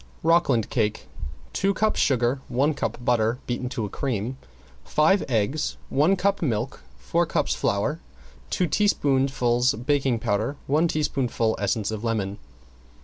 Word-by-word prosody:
~ROCKLAND 160 Hz, -9 st, +3 dB
CAKE~ 110 Hz, -3 st, 0 dB, 0.5 s
Two 195 Hz, 0 st, +1 dB
cups 215 Hz, 0 st, +1 dB
sugar, 125 Hz, 0 st, +2 dB
one 135 Hz, +5 st, +1 dB
cup 140 Hz, -, -3 dB
butter 115 Hz, -1 st, +2 dB
beaten 125 Hz, +1 st, -3 dB
to 115 Hz, -4 st, -3 dB
a -, -, -5 dB
cream, 125 Hz, 0 st, -2 dB, 0.5 s
five 160 Hz, -, +3 dB
eggs, 120 Hz, +6 st, 0 dB
one 155 Hz, +8 st, +3 dB
cup 200 Hz, +2 st, 0 dB
milk, 120 Hz, -4 st, -2 dB, 0.2 s
four -, -, 0 dB
cups -, -, 0 dB
flour, 120 Hz, +11 st, 0 dB, 0.5 s
two 180 Hz, -, +1 dB
teaspoonfuls 135 Hz, -, +2 dB
baking 130 Hz, +1 st, +1 dB
powder, 110 Hz, +6 st, -1 dB
one 155 Hz, +5 st, +2 dB
teaspoonful 130 Hz, -7 st, 0 dB
essence 105 Hz, +1 st, 0 dB
of 110 Hz, 0 st, -5 dB
lemon. 105 Hz, -3 st, -2 dB
125 Hz, 135 wpm, -25 LUFS, 115-150 Hz, 0.5 s, ~ROCKLAND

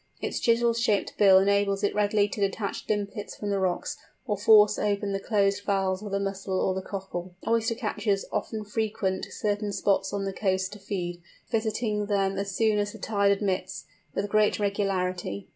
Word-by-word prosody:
Its -, -, -3 dB
chisel 235 Hz, 0 st, +3 dB
shaped 230 Hz, -3 st, 0 dB
bill 195 Hz, -2 st, +7 dB
enables 200 Hz, +1 st, +2 dB
it 205 Hz, -, +2 dB
readily 205 Hz, 0 st, +2 dB
to 205 Hz, -, -6 dB
detach 200 Hz, +1 st, -2 dB
limpets 205 Hz, 0 st, -2 dB
from 205 Hz, -1 st, -4 dB
the 200 Hz, -, +1 dB
rocks, 185 Hz, -2 st, -1 dB, 0.3 s
or 210 Hz, -5 st, 0 dB
force 210 Hz, +1 st, +6 dB
open 205 Hz, -1 st, 0 dB
the 195 Hz, -, -1 dB
closed 200 Hz, -1 st, +1 dB
valves 195 Hz, -1 st, 0 dB
of 210 Hz, -2 st, -7 dB
the 200 Hz, -, 0 dB
mussel 195 Hz, -1 st, -2 dB
or 190 Hz, -, +1 dB
the 190 Hz, -, -3 dB
cockle. 185 Hz, -2 st, -6 dB
Oyster 230 Hz, 0 st, +1 dB
catchers 210 Hz, -3 st, -1 dB
often 220 Hz, -2 st, -3 dB
frequent 210 Hz, -3 st, -2 dB
certain 205 Hz, 0 st, -2 dB
spots 195 Hz, -1 st, +1 dB
on 200 Hz, -1 st, -2 dB
the 195 Hz, -, -3 dB
coast 190 Hz, -1 st, 0 dB
to 210 Hz, -, -10 dB
feed, 175 Hz, -3 st, -4 dB, 0.3 s
visiting 220 Hz, -2 st, -1 dB
them 195 Hz, -1 st, 0 dB
as 200 Hz, 0 st, -2 dB
soon 215 Hz, -1 st, +2 dB
as 205 Hz, 0 st, -1 dB
the -, -, -9 dB
tide 200 Hz, -2 st, +1 dB
admits, 190 Hz, -2 st, -1 dB, 0.3 s
with 200 Hz, -, -1 dB
great 210 Hz, +1 st, +3 dB
regularity. 185 Hz, -, -1 dB
200 Hz, 180 wpm, -27 LUFS, 195-210 Hz, 0.3 s, bill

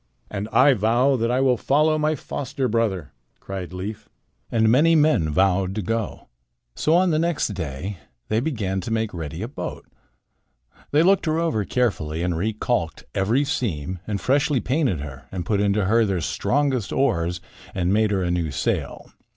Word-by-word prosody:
"And 105 Hz, +1 st, -4 dB
I 135 Hz, +2 st, +6 dB
vow 120 Hz, +5 st, +2 dB
that 115 Hz, -2 st, 0 dB
I 125 Hz, +2 st, +2 dB
will 130 Hz, -2 st, +3 dB
follow 155 Hz, +5 st, +2 dB
my 155 Hz, +1 st, +1 dB
foster 135 Hz, -1 st, -3 dB
brother," 105 Hz, -, -1 dB, 0.3 s
cried 95 Hz, -2 st, -6 dB
Leif. 105 Hz, +4 st, -6 dB, 0.4 s
And 110 Hz, -1 st, +3 dB
many 150 Hz, +9 st, +5 dB
men 150 Hz, -, +3 dB
vowed 95 Hz, +3 st, +2 dB
to 105 Hz, -, -2 dB
go. 115 Hz, +2 st, -3 dB, 0.5 s
So 155 Hz, -, +2 dB
on 180 Hz, 0 st, +4 dB
the 155 Hz, -, +2 dB
next 170 Hz, -5 st, 0 dB
day 90 Hz, 0 st, -5 dB, 0.3 s
they 110 Hz, -, +1 dB
began 105 Hz, -9 st, -2 dB
to 115 Hz, -, -6 dB
make 110 Hz, -1 st, -1 dB
ready 80 Hz, +2 st, -5 dB
a -, -, -3 dB
boat. 135 Hz, -, -6 dB, 1.0 s
They 150 Hz, +2 st, +4 dB
looked 190 Hz, -1 st, +3 dB
her 155 Hz, 0 st, +1 dB
over 160 Hz, -12 st, 0 dB
carefully 85 Hz, -11 st, -1 dB
and 90 Hz, -1 st, 0 dB
recalked 105 Hz, -2 st, -1 dB
every 110 Hz, +9 st, +2 dB
seam 95 Hz, -, -2 dB
and 105 Hz, -2 st, -2 dB
freshly 140 Hz, +3 st, +2 dB
painted 125 Hz, -, 0 dB
her 70 Hz, -2 st, -9 dB
and 90 Hz, -2 st, -4 dB
put 100 Hz, 0 st, +1 dB
into 100 Hz, 0 st, +2 dB
her 115 Hz, +4 st, +4 dB
their 95 Hz, -4 st, 0 dB
strongest 130 Hz, -, 0 dB
oars 90 Hz, -10 st, +1 dB, 0.4 s
and 90 Hz, 0 st, +1 dB
made 110 Hz, 0 st, +3 dB
her 95 Hz, -2 st, 0 dB
a 90 Hz, -, 0 dB
new 85 Hz, -3 st, 0 dB
sail. 70 Hz, -, -3 dB
110 Hz, 175 wpm, -23 LUFS, 95-135 Hz, 1.0 s, I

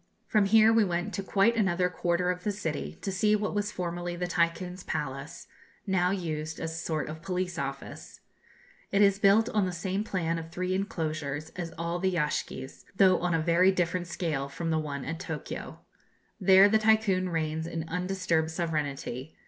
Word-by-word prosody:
From 210 Hz, -2 st, +3 dB
here 220 Hz, +2 st, +6 dB
we 225 Hz, -1 st, +5 dB
went 180 Hz, +2 st, -2 dB
to -, -, -2 dB
quite 200 Hz, +4 st, +2 dB
another 185 Hz, -4 st, +2 dB
quarter 180 Hz, 0 st, 0 dB
of 180 Hz, 0 st, -6 dB
the 210 Hz, -, 0 dB
city 165 Hz, -7 st, -4 dB
to 195 Hz, -, -1 dB
see 210 Hz, +3 st, +3 dB
what 210 Hz, 0 st, -1 dB
was 205 Hz, 0 st, -1 dB
formerly 175 Hz, -1 st, -4 dB
the 180 Hz, +1 st, -2 dB
Tycoon's 180 Hz, +1 st, -1 dB
palace, 140 Hz, +1 st, -4 dB, 0.4 s
now 185 Hz, -2 st, +2 dB
used 160 Hz, -4 st, -3 dB
as 165 Hz, -, -3 dB
a -, -, -6 dB
sort 155 Hz, -3 st, -2 dB
of 155 Hz, +1 st, -7 dB
police 180 Hz, -1 st, -2 dB
office. 135 Hz, 0 st, -6 dB, 0.7 s
It 200 Hz, +1 st, +4 dB
is 200 Hz, 0 st, +4 dB
built 205 Hz, +3 st, +5 dB
on 205 Hz, -3 st, +1 dB
the -, -, -2 dB
same 190 Hz, +3 st, -2 dB
plan 170 Hz, -5 st, -1 dB
of 165 Hz, 0 st, -8 dB
three 180 Hz, +2 st, -2 dB
enclosures 155 Hz, -6 st, -3 dB
as 170 Hz, -2 st, -5 dB
all 170 Hz, +1 st, -2 dB
the 190 Hz, 0 st, 0 dB
yashgis, 150 Hz, -4 st, -3 dB
though 185 Hz, -2 st, +5 dB
on 175 Hz, -1 st, 0 dB
a -, -, +2 dB
very 170 Hz, +4 st, +4 dB
different 175 Hz, -1 st, -1 dB
scale 155 Hz, -6 st, -2 dB
from 165 Hz, +3 st, -3 dB
the 160 Hz, -, +2 dB
one 140 Hz, -3 st, -4 dB
at 165 Hz, +1 st, -4 dB
Tokio. -, -, -6 dB, 0.6 s
There, 190 Hz, 0 st, +7 dB
the 220 Hz, +1 st, +3 dB
Tycoon 215 Hz, -4 st, +3 dB
reigns 160 Hz, -1 st, -2 dB
in 165 Hz, -1 st, -4 dB
undisturbed 180 Hz, -2 st, 0 dB
sovereignty. 150 Hz, -4 st, -3 dB
175 Hz, 180 wpm, -29 LUFS, 160-195 Hz, 0.7 s, There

